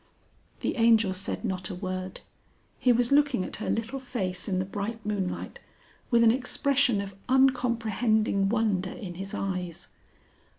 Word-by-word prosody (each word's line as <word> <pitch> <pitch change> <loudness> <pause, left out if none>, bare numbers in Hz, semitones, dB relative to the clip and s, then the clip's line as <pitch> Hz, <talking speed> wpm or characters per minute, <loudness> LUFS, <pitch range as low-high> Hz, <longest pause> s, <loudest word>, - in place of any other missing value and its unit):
The - - -1
Angel 225 -4 +4
said 190 +5 -3
not 190 -2 -2
a 185 - -5
word. 185 0 -5 0.6
He 250 - +4
was 240 +1 +2
looking 285 -7 +3
at - - -6
her 215 - -4
little 230 +4 -2
face 195 -9 -3
in 185 - 0
the 185 - 0
bright 205 +3 -5
moonlight, 200 -3 -3 0.5
with 235 -2 +4
an 225 - +7
expression 260 -2 +2
of 200 0 -7 0.2
uncomprehending 235 -6 +2
wonder 205 -5 0
in 195 -8 -7
his 195 +2 -5
eyes. 180 -3 -4
215 Hz, 145 wpm, -27 LUFS, 190-240 Hz, 0.6 s, an